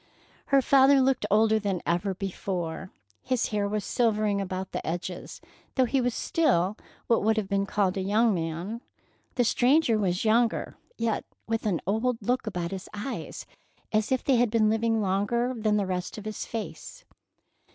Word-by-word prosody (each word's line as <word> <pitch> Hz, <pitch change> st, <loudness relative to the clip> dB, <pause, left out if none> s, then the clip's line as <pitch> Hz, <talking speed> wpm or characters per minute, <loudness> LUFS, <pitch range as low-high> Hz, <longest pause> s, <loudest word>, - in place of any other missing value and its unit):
Her 275 Hz, -1 st, +4 dB
father 275 Hz, +1 st, +6 dB
looked 260 Hz, -5 st, +2 dB
older 220 Hz, +1 st, +4 dB
than 200 Hz, -3 st, -1 dB
ever 175 Hz, +3 st, 0 dB
before. 185 Hz, -2 st, -4 dB, 0.3 s
His 255 Hz, -2 st, 0 dB
hair 205 Hz, -2 st, 0 dB
was 210 Hz, 0 st, -2 dB
silvering 215 Hz, -4 st, +1 dB
about 190 Hz, 0 st, -4 dB
the -, -, -4 dB
edges, 175 Hz, +2 st, -5 dB, 0.3 s
though 260 Hz, -, +4 dB
he 265 Hz, +2 st, +1 dB
was 245 Hz, -1 st, 0 dB
still 215 Hz, -, +1 dB, 0.3 s
what 230 Hz, -, +2 dB
would 220 Hz, +1 st, +2 dB
have 210 Hz, -3 st, -1 dB
been 200 Hz, 0 st, 0 dB
called 195 Hz, -2 st, 0 dB
a -, -, 0 dB
young 215 Hz, +4 st, +3 dB
man. 170 Hz, +6 st, -3 dB, 0.5 s
The 245 Hz, -, +3 dB
stranger 245 Hz, 0 st, +3 dB
was 185 Hz, 0 st, 0 dB
younger, 225 Hz, +1 st, +2 dB, 0.2 s
yet 230 Hz, -2 st, -1 dB, 0.2 s
with 225 Hz, 0 st, -1 dB
an 185 Hz, -5 st, 0 dB
old 225 Hz, +5 st, 0 dB
look 245 Hz, +3 st, -1 dB
about 180 Hz, -4 st, -3 dB
his 190 Hz, -1 st, -6 dB
eyes, 235 Hz, +6 st, -5 dB, 0.5 s
as 215 Hz, +2 st, +1 dB
if 260 Hz, -, +1 dB
they 265 Hz, -3 st, +3 dB
had 240 Hz, 0 st, +3 dB
been 215 Hz, -1 st, +3 dB
living 225 Hz, 0 st, +1 dB
longer 205 Hz, +6 st, 0 dB
than 215 Hz, -2 st, +1 dB
the 200 Hz, -, +1 dB
rest 185 Hz, +1 st, -3 dB
of 215 Hz, -, -8 dB
his 215 Hz, -1 st, -5 dB
face. 230 Hz, -, -7 dB
215 Hz, 170 wpm, -27 LUFS, 195-235 Hz, 0.5 s, father